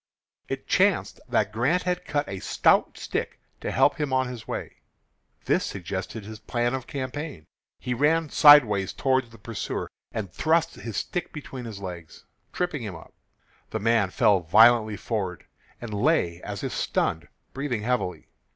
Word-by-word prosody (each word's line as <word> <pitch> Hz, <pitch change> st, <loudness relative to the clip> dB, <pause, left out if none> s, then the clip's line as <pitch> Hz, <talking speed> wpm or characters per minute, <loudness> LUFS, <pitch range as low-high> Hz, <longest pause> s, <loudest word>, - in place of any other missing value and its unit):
It -, -, -4 dB
chanced -, -, +2 dB
that 105 Hz, -1 st, +1 dB
Grant 135 Hz, +11 st, +1 dB
had 180 Hz, 0 st, -2 dB
cut 145 Hz, 0 st, -1 dB
a 95 Hz, -, -5 dB
stout -, -, +2 dB
stick -, -, -4 dB, 0.2 s
to -, -, -4 dB
help -, -, +3 dB
him 145 Hz, -3 st, -1 dB
on 130 Hz, 0 st, +2 dB
his 120 Hz, -3 st, -8 dB
way. -, -, -5 dB, 0.7 s
This -, -, +2 dB
suggested 95 Hz, +3 st, -5 dB
his 110 Hz, 0 st, -9 dB
plan 120 Hz, +2 st, -1 dB
of 130 Hz, -2 st, -4 dB
campaign. 140 Hz, -, -5 dB, 0.3 s
He 125 Hz, -, -2 dB
ran 150 Hz, +5 st, +2 dB
sideways 115 Hz, -10 st, +7 dB
toward 130 Hz, -2 st, +1 dB
the 115 Hz, -, -15 dB
pursuer, 110 Hz, 0 st, -5 dB, 0.2 s
and 100 Hz, -5 st, -5 dB
thrust 160 Hz, +1 st, +2 dB
his 115 Hz, -3 st, -6 dB
stick 175 Hz, -1 st, -3 dB
between 135 Hz, -4 st, -8 dB
his 105 Hz, -4 st, -7 dB
legs, 85 Hz, -4 st, -8 dB, 0.3 s
tripping 175 Hz, -6 st, -2 dB
him 105 Hz, -5 st, -5 dB
up. 80 Hz, -, -13 dB, 0.6 s
The -, -, -3 dB
man 115 Hz, -2 st, +2 dB
fell 100 Hz, +1 st, +3 dB
violently 110 Hz, +5 st, +5 dB
forward, 95 Hz, -5 st, -3 dB, 0.3 s
and 115 Hz, -3 st, -7 dB
lay 100 Hz, -, +1 dB
as -, -, -6 dB
if -, -, -3 dB
stunned, -, -, -1 dB, 0.3 s
breathing 130 Hz, -6 st, -2 dB
heavily. 120 Hz, -7 st, -1 dB
115 Hz, 160 wpm, -26 LUFS, 100-140 Hz, 0.7 s, sideways